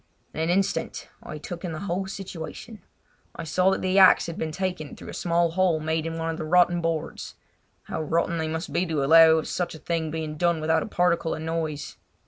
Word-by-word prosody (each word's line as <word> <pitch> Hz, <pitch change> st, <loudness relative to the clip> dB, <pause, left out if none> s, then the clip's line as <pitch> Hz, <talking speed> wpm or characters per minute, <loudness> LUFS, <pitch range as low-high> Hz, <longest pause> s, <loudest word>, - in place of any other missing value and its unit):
In -, -, -6 dB
an 160 Hz, +1 st, 0 dB
instant 190 Hz, +2 st, -1 dB
I 155 Hz, -, -8 dB
took 170 Hz, +4 st, -8 dB
in 175 Hz, -3 st, -4 dB
the 155 Hz, -, -6 dB
whole 190 Hz, 0 st, -2 dB
situation. 195 Hz, +3 st, -8 dB, 0.5 s
I -, -, -6 dB
saw 180 Hz, +4 st, +2 dB
that 190 Hz, -, -1 dB
the 185 Hz, +1 st, +3 dB
axe 190 Hz, -1 st, +7 dB
had 165 Hz, -, -5 dB
been 160 Hz, -, -3 dB
taken 180 Hz, -3 st, -4 dB
through -, -, -11 dB
a -, -, -7 dB
small 170 Hz, -1 st, +1 dB
hole 180 Hz, -2 st, +2 dB
made 160 Hz, +1 st, -1 dB
in 165 Hz, 0 st, -4 dB
one 165 Hz, 0 st, -2 dB
of 160 Hz, -, -5 dB
the -, -, -4 dB
rotten 175 Hz, +1 st, +3 dB
boards. 165 Hz, -2 st, -3 dB, 0.5 s
How 160 Hz, -, -4 dB
rotten 165 Hz, +2 st, 0 dB
they 160 Hz, -, -1 dB
must 160 Hz, +2 st, -4 dB
be 175 Hz, -, +2 dB
to 155 Hz, -4 st, -1 dB
allow 160 Hz, +2 st, +7 dB
of 160 Hz, -, -2 dB
such 180 Hz, -2 st, -3 dB
a -, -, -8 dB
thing 165 Hz, 0 st, -2 dB
being 155 Hz, -1 st, -4 dB
done 170 Hz, 0 st, +1 dB
without 160 Hz, +1 st, +2 dB
a -, -, -4 dB
particle 175 Hz, -4 st, +1 dB
of 155 Hz, -, -7 dB
noise. 160 Hz, -2 st, -3 dB
165 Hz, 225 wpm, -25 LUFS, 160-180 Hz, 0.5 s, axe